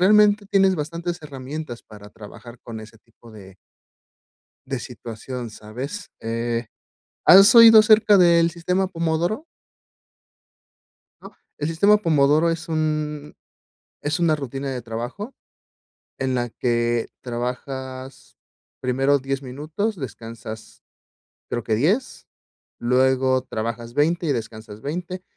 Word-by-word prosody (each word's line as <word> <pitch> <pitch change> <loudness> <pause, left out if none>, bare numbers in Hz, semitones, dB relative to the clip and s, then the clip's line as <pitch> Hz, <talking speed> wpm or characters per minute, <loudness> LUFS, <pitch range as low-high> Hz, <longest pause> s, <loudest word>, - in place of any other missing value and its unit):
realmente 210 +1 +5
tienes 195 -1 +3
bastantes 170 +3 -4
herramientas 140 -2 -7
para 105 -1 -13
trabajar 115 +3 -13
con 115 -2 -8
ese 110 0 -12
tipo 115 +1 -19
de 95 -3 -13 1.1
de 135 -2 -3
situación, 120 0 -7
¿sabes? 125 - -7
Eh, 115 +1 -2 0.6
¿has 195 +5 +8
oído 225 -2 +10
acerca 215 -1 +5
del 170 -2 +5
sistema 180 +3 -1
pomodoro? 170 - -1 1.7
¿No?, - - -14 0.2
el 150 - -2
sistema 200 +6 +4
pomodoro 155 -2 +3
es 165 0 -4
un 155 -2 -2 0.7
es 150 +4 -1
una 160 -2 +3
rutina 135 0 -5
de 125 -2 -5
trabajo 120 - -6 0.8
en 130 -1 -1
la 120 -1 -1
que 120 0 0
trabajas 130 +2 -6 0.4
primero 135 +2 +2
10 135 +1 -3
minutos, 155 - -4
descansas 115 -5 -9 0.7
creo 120 - -3
que 110 - 0
10 190 - 0 0.5
luego 130 +1 +2
trabajas 115 0 -5
20 165 +4 +1
y 145 - +2
descansas 110 -2 -7
20, 180 +7 -5
135 Hz, 115 wpm, -22 LUFS, 120-170 Hz, 1.7 s, oído